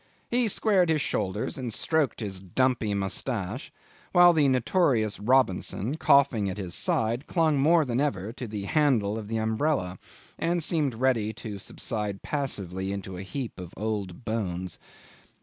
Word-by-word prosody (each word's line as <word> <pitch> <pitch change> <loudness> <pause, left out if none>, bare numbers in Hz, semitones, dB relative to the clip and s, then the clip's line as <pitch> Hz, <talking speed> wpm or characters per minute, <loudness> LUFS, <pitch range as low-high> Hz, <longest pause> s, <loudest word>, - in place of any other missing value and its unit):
he 240 -1 +3
squared 195 -4 +2
his 160 -1 +3
shoulders 105 0 -2
and 125 -3 -3
stroked 150 +1 0
his 100 -3 -4
dumpy 110 +2 0
moustache, 100 +3 -2 0.4
while 175 -1 +8
the 150 -3 +4
notorious 125 - +2
Robinson, 115 0 +1
coughing 140 -9 +3
at 95 - -5
his 90 -4 -5
side, 115 +8 0
clung 160 -5 +2
more 160 +3 +4
than 120 -1 -1
ever 110 -7 -1
to 125 0 -6
the 105 -2 -5
handle 115 -5 +2
of 110 -2 -5
the 110 +1 -2
umbrella, 110 - 0 0.4
and 170 0 0
seemed 150 -7 0
ready 115 -3 +1
to 105 -3 -7
subside 105 0 -4
passively 100 - -2
into 100 -1 -5
a 90 - -6
heap 120 +2 -5
of 90 -1 -9
old 105 -1 -4
bones. 95 -6 -3
115 Hz, 150 wpm, -27 LUFS, 100-140 Hz, 0.4 s, while